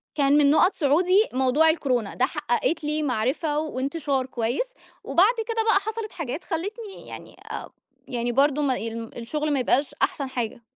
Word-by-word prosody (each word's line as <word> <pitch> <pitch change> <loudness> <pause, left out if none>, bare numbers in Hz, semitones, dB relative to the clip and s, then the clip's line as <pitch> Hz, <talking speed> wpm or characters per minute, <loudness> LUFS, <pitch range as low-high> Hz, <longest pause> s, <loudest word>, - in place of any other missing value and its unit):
كان 285 0 +4
من 285 -1 +5
نُقط 355 +5 +4
صعودي 360 +8 +3
موضوع 265 +5 +3
الكورونا، 255 -9 0
ده 255 - +2
حققت 295 +1 -1
لي 305 +1 -1
معرفة 280 +4 0
وانتشار 280 -2 -2
كويّس، 260 - -2 0.3
وبعد 410 +8 +4
كده 455 -1 0
بقى 440 -3 +4
حصلت 435 +1 -5
حاجات 300 0 -5
خلّتني 405 +5 -5
يعني - - -10 0.2
آآ - - -6 0.4
يعني 240 -1 -2
برضو 285 +3 +3
ما 265 -3 +1
ال 225 0 -6
الشُّغل 295 +6 -2
ما 275 - +1
يبقاش 275 +3 +1
أحسن 275 -2 0
حاجة. 235 -2 -4
290 Hz, 160 wpm, -25 LUFS, 255-335 Hz, 0.4 s, من